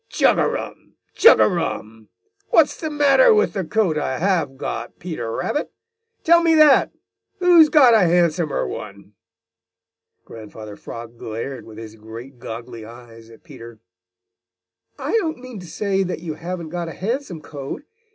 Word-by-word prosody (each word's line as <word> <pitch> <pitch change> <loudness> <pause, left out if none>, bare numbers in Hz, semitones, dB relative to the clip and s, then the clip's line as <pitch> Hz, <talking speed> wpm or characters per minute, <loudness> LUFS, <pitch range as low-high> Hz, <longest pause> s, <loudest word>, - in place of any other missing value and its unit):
"Chug - - +2
a - - +2
rum! - - -7 0.2
Chug - - +6
a - - +5
rum! 110 0 -4 0.4
What's 315 -3 +3
the 315 - -5
matter 300 - +4
with 430 - +1
the 195 -3 -2
coat 175 -3 0
I 130 -3 -2
have 165 -6 0
got, 120 -2 -6
Peter 155 -10 -5
Rabbit? 295 - -3 0.5
Tell 340 +1 +5
me 330 -1 +3
that! 305 -3 +5 0.5
Who's 350 -4 +6
got 270 -7 +6
a 225 - +6
handsomer 170 -2 +1
one?" 100 -1 -9 1.1
Grandfather 110 -1 -10
Frog 115 +2 -10
glared 115 +5 -6
with 110 -1 -13
his 110 -1 -10
great, 115 +4 -11
goggly 115 0 -8
eyes 115 0 -14
at 115 - -17
Peter. 115 -7 -12 1.2
"I - - -4
didn't 330 -9 0
mean 250 -4 -10
to 180 - -11
say 195 +1 -1
that 185 -1 -2
you 165 -2 -5
haven't 170 +1 -6
got 175 0 -4
a 165 - -7
handsome 215 - -4
coat. 140 - -8
160 Hz, 155 wpm, -21 LUFS, -, 1.2 s, Chug